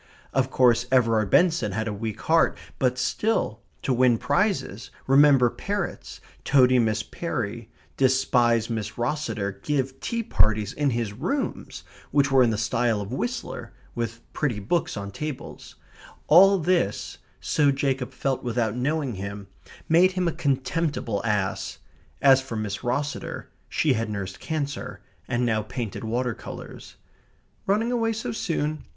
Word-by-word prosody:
Of 135 Hz, -1 st, +1 dB
course 120 Hz, -2 st, +3 dB
Everard 115 Hz, -5 st, +3 dB
Benson 165 Hz, -, +3 dB
had 110 Hz, +2 st, -2 dB
a 105 Hz, -, -2 dB
weak 110 Hz, +1 st, -5 dB
heart, 165 Hz, 0 st, +3 dB, 0.2 s
but 125 Hz, -2 st, +1 dB
still, 170 Hz, -, 0 dB, 0.2 s
to 135 Hz, -, +1 dB
win 125 Hz, -1 st, +4 dB
prizes, 125 Hz, -, -1 dB, 0.2 s
remember 135 Hz, -3 st, +5 dB
parrots, 200 Hz, -2 st, -4 dB, 0.2 s
toady 130 Hz, -2 st, +5 dB
Miss 110 Hz, -2 st, +1 dB
Perry, 115 Hz, -6 st, -4 dB, 0.3 s
despise 125 Hz, -3 st, +3 dB
Miss 110 Hz, -2 st, -4 dB
Rosseter, 115 Hz, -7 st, -2 dB
give 135 Hz, -1 st, -1 dB
tea 235 Hz, -1 st, -2 dB
parties 110 Hz, -, +2 dB
in 145 Hz, -1 st, +1 dB
his 115 Hz, -4 st, -2 dB
rooms 185 Hz, -, -3 dB, 0.3 s
(which 140 Hz, -1 st, +2 dB
were 135 Hz, -1 st, +6 dB
in 120 Hz, -, +5 dB
the 110 Hz, -, -1 dB
style 115 Hz, 0 st, +1 dB
of 100 Hz, +3 st, -5 dB
Whistler, 120 Hz, -2 st, -4 dB, 0.2 s
with 115 Hz, -1 st, -4 dB
pretty 135 Hz, -8 st, -1 dB
books 115 Hz, -, -1 dB
on 100 Hz, 0 st, -5 dB
tables), 150 Hz, +5 st, -7 dB, 0.5 s
all 195 Hz, +5 st, +7 dB
this, 170 Hz, -, 0 dB, 0.2 s
so 145 Hz, -2 st, +2 dB
Jacob 135 Hz, -2 st, -1 dB
felt 135 Hz, -2 st, -2 dB
without 115 Hz, -2 st, -1 dB
knowing 140 Hz, +1 st, -1 dB
him, 100 Hz, 0 st, -7 dB, 0.4 s
made 180 Hz, +3 st, +5 dB
him 185 Hz, -1 st, 0 dB
a -, -, +2 dB
contemptible 135 Hz, -6 st, -1 dB
ass. 105 Hz, -3 st, -1 dB, 0.5 s
As 135 Hz, -1 st, +7 dB
for 130 Hz, -3 st, -7 dB
Miss 105 Hz, -2 st, -3 dB
Rosseter, 140 Hz, +3 st, -3 dB, 0.2 s
she 150 Hz, -4 st, +2 dB
had 115 Hz, -2 st, -2 dB
nursed 100 Hz, -3 st, -5 dB
cancer, 145 Hz, -3 st, -4 dB, 0.3 s
and 120 Hz, +1 st, 0 dB
now 110 Hz, -2 st, +1 dB
painted 115 Hz, 0 st, -5 dB
water 120 Hz, +2 st, -1 dB
colours. -, -, -10 dB, 0.7 s
"Running 215 Hz, +5 st, +2 dB
away 225 Hz, -2 st, +1 dB
so 220 Hz, -, -4 dB
soon?" 155 Hz, -7 st, -2 dB
125 Hz, 145 wpm, -25 LUFS, 110-150 Hz, 0.7 s, all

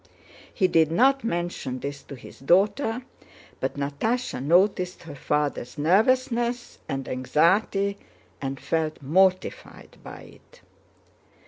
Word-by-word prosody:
He 190 Hz, -, +2 dB
did 160 Hz, -3 st, +3 dB
not 270 Hz, +9 st, +3 dB
mention 175 Hz, -, -3 dB
this 140 Hz, +2 st, -6 dB
to 140 Hz, -, -10 dB
his 125 Hz, -, -13 dB
daughter, 210 Hz, -, +2 dB, 0.6 s
but -, -, -2 dB
Natásha 145 Hz, -, -2 dB
noticed 180 Hz, +3 st, +2 dB
her 165 Hz, -3 st, -9 dB
father's 145 Hz, -2 st, -2 dB
nervousness 240 Hz, -, +1 dB
and 135 Hz, -2 st, -3 dB
anxiety 195 Hz, +9 st, +1 dB, 0.4 s
and 135 Hz, -1 st, -4 dB
felt 155 Hz, +3 st, -2 dB
mortified 185 Hz, +6 st, 0 dB
by -, -, -10 dB
it. -, -, -18 dB
175 Hz, 110 wpm, -25 LUFS, 140-215 Hz, 0.6 s, did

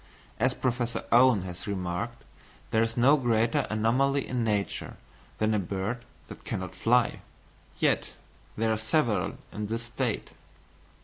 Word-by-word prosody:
As 130 Hz, +3 st, +2 dB
Professor 120 Hz, -2 st, -1 dB
Owen 120 Hz, -4 st, +6 dB
has 90 Hz, +1 st, -7 dB
remarked, 100 Hz, +4 st, -3 dB, 0.5 s
there 110 Hz, -, +3 dB
is 115 Hz, +1 st, -1 dB
no 130 Hz, +5 st, +6 dB
greater 115 Hz, -3 st, +2 dB
anomaly 130 Hz, +6 st, +2 dB
in 125 Hz, -2 st, -1 dB
nature 105 Hz, -3 st, -1 dB, 0.4 s
than 110 Hz, 0 st, +1 dB
a 105 Hz, -, +2 dB
bird 100 Hz, +6 st, -3 dB, 0.2 s
that -, -, -11 dB
cannot 95 Hz, -2 st, -4 dB
fly; 120 Hz, +1 st, +2 dB, 0.6 s
yet -, -, +1 dB, 0.4 s
there 110 Hz, 0 st, +2 dB
are -, -, 0 dB
several 110 Hz, +1 st, +1 dB, 0.2 s
in 105 Hz, 0 st, -4 dB
this 115 Hz, +2 st, -3 dB
state. 115 Hz, -, -2 dB
115 Hz, 135 wpm, -28 LUFS, 105-120 Hz, 0.6 s, Owen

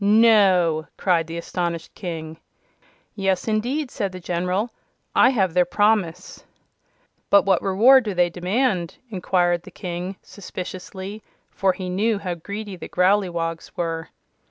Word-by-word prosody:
"No!" 200 Hz, -7 st, +4 dB
cried 170 Hz, -4 st, +1 dB
the 165 Hz, +1 st, -6 dB
astonished 170 Hz, -1 st, -3 dB
King. 160 Hz, -3 st, -6 dB, 0.7 s
"Yes, 195 Hz, -2 st, -1 dB
indeed," 245 Hz, +6 st, -1 dB
said 200 Hz, -2 st, -2 dB
the 185 Hz, -, -8 dB
General. 180 Hz, +6 st, -1 dB, 0.4 s
"I -, -, +6 dB
have 195 Hz, -9 st, +1 dB
their 180 Hz, 0 st, +4 dB
promise." 190 Hz, -2 st, 0 dB, 0.9 s
"But 200 Hz, -, +5 dB
what 190 Hz, -3 st, +3 dB
reward 230 Hz, +7 st, +5 dB
do 205 Hz, -3 st, -3 dB
they 175 Hz, -1 st, +2 dB
demand?" 185 Hz, 0 st, -1 dB
inquired 175 Hz, -2 st, +1 dB
the -, -, -12 dB
King, 180 Hz, +1 st, -5 dB
suspiciously, 190 Hz, +1 st, -8 dB, 0.3 s
for 190 Hz, -1 st, +1 dB
he 185 Hz, -1 st, -6 dB
knew 205 Hz, +4 st, +1 dB
how 185 Hz, -3 st, -3 dB
greedy 200 Hz, +4 st, -6 dB
the 175 Hz, -, -9 dB
Growleywogs 180 Hz, -3 st, 0 dB
were. 165 Hz, -1 st, -3 dB
185 Hz, 130 wpm, -23 LUFS, 175-205 Hz, 0.9 s, I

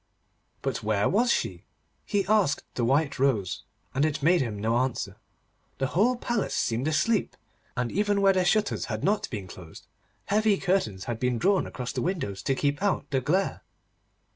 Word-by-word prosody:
But 130 Hz, -4 st, -2 dB
where 105 Hz, -1 st, +1 dB
was 235 Hz, +5 st, +3 dB
she? -, -, -1 dB, 0.4 s
He 200 Hz, -3 st, +1 dB
asked 195 Hz, -8 st, +2 dB
the 120 Hz, -, -1 dB
white 140 Hz, +4 st, +1 dB
rose, 125 Hz, -9 st, +1 dB, 0.3 s
and 135 Hz, +2 st, +1 dB
it 150 Hz, -2 st, 0 dB
made 175 Hz, +3 st, +4 dB
him 110 Hz, -5 st, -3 dB
no 115 Hz, +3 st, +1 dB
answer. 130 Hz, -1 st, -2 dB, 0.6 s
The 135 Hz, -, 0 dB
whole 230 Hz, +8 st, +3 dB
palace 235 Hz, -3 st, -2 dB
seemed 120 Hz, +5 st, 0 dB
asleep, 200 Hz, +7 st, +1 dB, 0.4 s
and 125 Hz, -1 st, -1 dB
even 205 Hz, 0 st, +1 dB
where 195 Hz, -1 st, +5 dB
the 185 Hz, -1 st, +2 dB
shutters 210 Hz, +3 st, +1 dB
had -, -, -4 dB
not 205 Hz, +2 st, +1 dB
been 105 Hz, -5 st, -5 dB
closed, 90 Hz, -3 st, -12 dB, 0.4 s
heavy 210 Hz, 0 st, +3 dB
curtains 175 Hz, -, 0 dB
had 120 Hz, -2 st, -4 dB
been 125 Hz, -1 st, 0 dB
drawn 195 Hz, -, +2 dB
across 125 Hz, -1 st, -5 dB
the -, -, -2 dB
windows 160 Hz, -, -2 dB
to 135 Hz, -, 0 dB
keep 145 Hz, +3 st, 0 dB
out 195 Hz, -8 st, 0 dB
the 135 Hz, -2 st, +1 dB
glare. 185 Hz, +9 st, 0 dB
145 Hz, 175 wpm, -27 LUFS, 120-195 Hz, 0.6 s, where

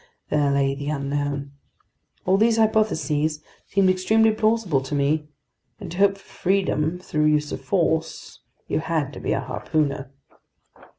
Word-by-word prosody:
There 150 Hz, -1 st, +2 dB
lay 140 Hz, -1 st, +2 dB
the 140 Hz, +1 st, -5 dB
unknown. 140 Hz, -1 st, -2 dB, 0.7 s
All 185 Hz, -, +4 dB
these 225 Hz, +2 st, +3 dB
hypotheses 160 Hz, -9 st, +1 dB, 0.2 s
seemed 195 Hz, -1 st, +2 dB
extremely 220 Hz, +4 st, +3 dB
plausible 215 Hz, -9 st, +1 dB
to 135 Hz, +2 st, -4 dB
me, 150 Hz, +2 st, +1 dB, 0.5 s
and -, -, -8 dB
to 175 Hz, -, -7 dB
hope 200 Hz, 0 st, +4 dB
for 195 Hz, -, -19 dB, 0.2 s
freedom 180 Hz, -4 st, +1 dB
through 155 Hz, -4 st, -1 dB
use 150 Hz, -1 st, +2 dB
of -, -, -5 dB
force, 165 Hz, -4 st, -1 dB, 0.3 s
you -, -, 0 dB
had 155 Hz, -3 st, -2 dB
to -, -, -8 dB
be -, -, -2 dB
a -, -, -1 dB
harpooner. 140 Hz, -3 st, -2 dB
155 Hz, 145 wpm, -23 LUFS, 145-195 Hz, 0.7 s, All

